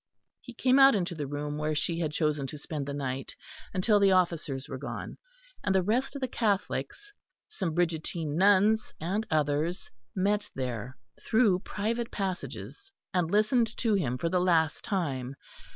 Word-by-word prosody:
He 245 - -11
came 255 +3 +4
out 270 -2 +8
into 180 -3 -1
the 150 -4 -4
room 145 +1 -4
where 155 0 -1
she 165 +2 -1
had 160 -3 -1
chosen 150 -3 0
to 150 - -7
spend 145 -1 -5
the - - -3
night 135 -2 -4 0.4
until 205 +3 +3
the 200 -1 +5
officers 165 -7 0
were 135 -3 -6
gone; 140 - -6 0.4
and 190 - +1
the 190 - +4
rest 245 +9 0
of 280 - -5
the 260 - 0
Catholics, 230 - -2 0.3
some 170 -6 -3
Brigittine 165 -2 -1
nuns 205 +4 +4
and 200 +7 -2
others, 155 +3 0 0.2
met 205 +2 +1
there 125 -1 -4 0.3
through 220 -5 +3
private 225 +5 -2
passages 200 - -5 0.2
and 180 -3 +1
listened 220 +3 +2
to 225 -3 +1
him 140 -11 0
for 145 - -1
the 180 +1 +2
last 165 -4 +2
time. 140 - -2
180 Hz, 165 wpm, -29 LUFS, 150-210 Hz, 0.4 s, out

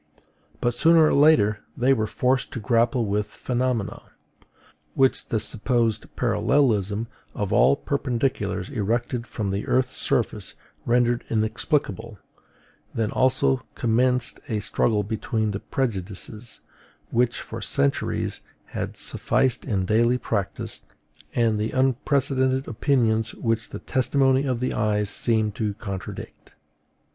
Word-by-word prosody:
But 120 - +1
sooner 165 +5 +5
or - - +3
later 125 -9 +5 0.2
they 130 +2 +4
were 110 -4 0
forced 130 +3 0
to - - -4
grapple 115 +3 +2
with 105 +1 -1
phenomena, 125 -2 -2 0.9
which 135 -1 +2
the 115 - 0
supposed 115 0 +1
parallelism 110 -3 +1 0.3
of 105 0 -2
all - - +5
perpendiculars 120 -10 -1
erected 120 +1 -1
from 105 -4 -3
the 100 +1 -3
earth's 130 0 +1
surface - - -1 0.3
rendered 120 0 +2
inexplicable: 110 0 -1 0.8
then 110 -1 0
also 110 - +2
commenced 125 +2 +1
a 110 -3 0
struggle 105 +1 +1
between 110 +1 -2
the 100 - -3
prejudices, 110 -1 -4 0.5
which 120 0 +1
for - - -7
centuries 70 0 0 0.3
had - - -4
sufficed 130 -1 0
in 95 -4 0
daily 115 +5 +3
practice, 100 -5 -3 0.5
and 115 -3 +2
the 110 +1 -2
unprecedented 130 0 +1
opinions 115 -2 +1
which 115 -1 -1
the - - -6
testimony 135 +1 +1
of 125 -3 -1
the 130 - -1
eyes 105 -1 0
seemed 110 -1 0
to 105 -1 -2
contradict. 100 -4 -8
115 Hz, 120 wpm, -24 LUFS, 105-130 Hz, 0.9 s, sooner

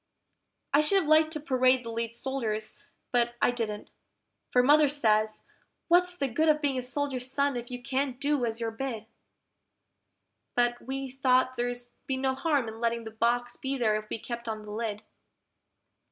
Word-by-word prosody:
I 290 - +6
should 350 +6 +3
have 360 -6 +1
liked 310 0 +5
to 305 - -2
parade 255 -3 +2
the 230 - -4
lead 230 0 -3
soldiers, 230 -5 -2 0.4
but 240 -1 +1
I - - +3
didn't, 220 -4 -4 0.6
for 250 - +4
Mother 295 +2 +6
says, 215 -6 +1 0.5
"What's 355 +1 +4
the 275 - 0
good 310 +6 +1
of 305 0 +4
being 280 -4 0
a - - -2
soldier's 255 0 -2
son 280 0 +1
if 240 0 -5
you 250 -1 -5
can't 265 -1 -1
do 285 -2 +1
as 230 -1 -1
you're 230 -1 -2
bid?" 225 -2 -4 1.5
But 240 0 +1
we 270 0 -5
thought 255 -1 +2
there'd 245 0 -1 0.3
be 265 - 0
no 265 0 +1
harm 280 -3 0
in 220 0 -7
letting 235 0 0
the 220 - -7
box 240 +2 0
be 270 +1 -3
there 220 -4 +2
if 215 0 -4
we - - -2
kept 235 +1 -6
on 215 -1 -4
the 210 - -9
lid. 215 -1 -3
250 Hz, 180 wpm, -29 LUFS, 230-275 Hz, 1.5 s, I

